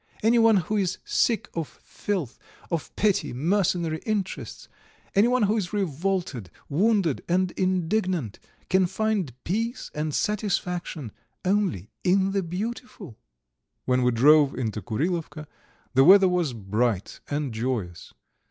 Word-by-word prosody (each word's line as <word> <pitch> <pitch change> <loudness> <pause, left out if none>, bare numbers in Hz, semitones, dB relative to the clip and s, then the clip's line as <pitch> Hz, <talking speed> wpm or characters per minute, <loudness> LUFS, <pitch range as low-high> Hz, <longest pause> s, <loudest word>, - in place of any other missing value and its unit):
Anyone 225 -1 +5
who 200 +4 -1
is 185 -2 0
sick 230 -2 +1
of 165 -3 -3 0.2
filth, 180 - -4 0.3
of 165 -3 -2
petty, 205 - +1
mercenary 165 +2 0
interests, 205 -2 -4 0.5
anyone 240 +4 +3
who 210 +2 +2
is 190 -4 -3
revolted, 175 - -2 0.2
wounded, 190 - +1
and 185 +1 +2
indignant, 185 - -1 0.3
can 185 -1 +3
find 200 -5 -1
peace 230 +7 -2
and 150 +1 -2
satisfaction 180 - -2 0.3
only 185 - 0
in 190 +1 +3
the 195 0 0
beautiful." 190 - -6 0.7
When 125 0 +2
we 125 - +3
drove 140 +4 +5
into 110 -4 -2
Kurilovka 155 - -3 0.5
the 135 +1 +6
weather 190 +4 +8
was 175 -7 0
bright 105 -1 -1
and 145 -4 -2
joyous. 110 -7 -3
180 Hz, 120 wpm, -25 LUFS, 135-200 Hz, 0.7 s, weather